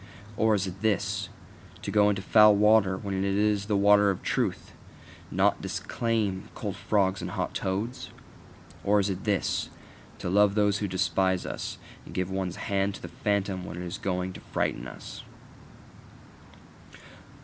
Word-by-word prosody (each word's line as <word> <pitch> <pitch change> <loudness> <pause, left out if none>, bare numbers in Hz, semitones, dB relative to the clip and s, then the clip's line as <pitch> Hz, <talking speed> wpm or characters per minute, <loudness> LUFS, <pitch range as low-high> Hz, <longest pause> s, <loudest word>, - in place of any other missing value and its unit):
Or 110 0 +3
is 100 -1 0
it 95 +1 -7
this: 100 -2 0 0.5
To - - -3
go 105 -1 +4
into 100 -2 -1
foul 105 0 +7
water 105 -2 +4
when 100 0 -5
it 95 0 -1
is 100 +1 +1
the 105 -2 +2
water 100 0 +5
of 95 - -2
truth, - - -1 0.6
and - - -7
not - - +3
disclaim 110 -5 -2
cold - - -4
frogs 95 -3 +1
and 90 - -4
hot 90 -1 -3
toads? 110 +7 -3 0.7
Or 105 +1 +3
is 100 0 +1
it 95 +1 -6
this: 100 -4 0 0.5
To - - -5
love 100 +2 +4
those 105 -1 +2
who 105 - -1
despise 95 0 +1
us, - - -5 0.3
and - - -12
give 95 0 -1
one's 95 -2 -2
hand 100 -1 -1
to - - -11
the 90 - -6
phantom 100 0 -1
when 85 - -7
it 90 - -5
is 90 +3 -5
going 90 -1 -2
to - - -9
frighten - - -2
us? - - -9
100 Hz, 165 wpm, -27 LUFS, 95-105 Hz, 0.7 s, foul